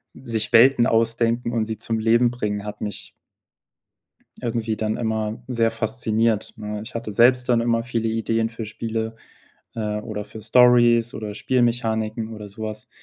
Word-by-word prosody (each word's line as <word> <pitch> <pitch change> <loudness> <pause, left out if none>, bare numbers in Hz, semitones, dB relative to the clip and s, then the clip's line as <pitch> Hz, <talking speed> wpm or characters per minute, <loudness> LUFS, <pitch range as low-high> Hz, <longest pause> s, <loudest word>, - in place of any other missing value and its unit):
sich 115 -4 -3
Welten 120 +1 +6
ausdenken 115 +1 +1
und 115 -2 0
sie 110 0 -4
zum 115 +1 -2
Leben 115 +2 +3
bringen 105 -4 -3
hat 105 0 -7
mich 105 -2 -6 1.3
irgendwie 115 -2 -2
dann 110 0 -1
immer 110 -1 -2
sehr 115 -3 +1
fasziniert, 110 -1 0
ne? 105 -2 -5
Ich 120 +2 -12
hatte 115 -2 -4
selbst 125 +4 +4
dann 120 -2 +4
immer 115 -1 +1
viele 115 -2 -2
Ideen 115 0 0
für 115 -1 -6
Spiele, 110 +1 -4 0.6
äh, 105 -2 -2
oder 105 -1 -5
für 110 - -10
Stories 120 -1 +5
oder 105 -1 -5
Spielmechaniken 115 -2 0
oder 105 -1 -8
sowas 110 +1 -7
115 Hz, 150 wpm, -23 LUFS, 110-120 Hz, 1.3 s, Welten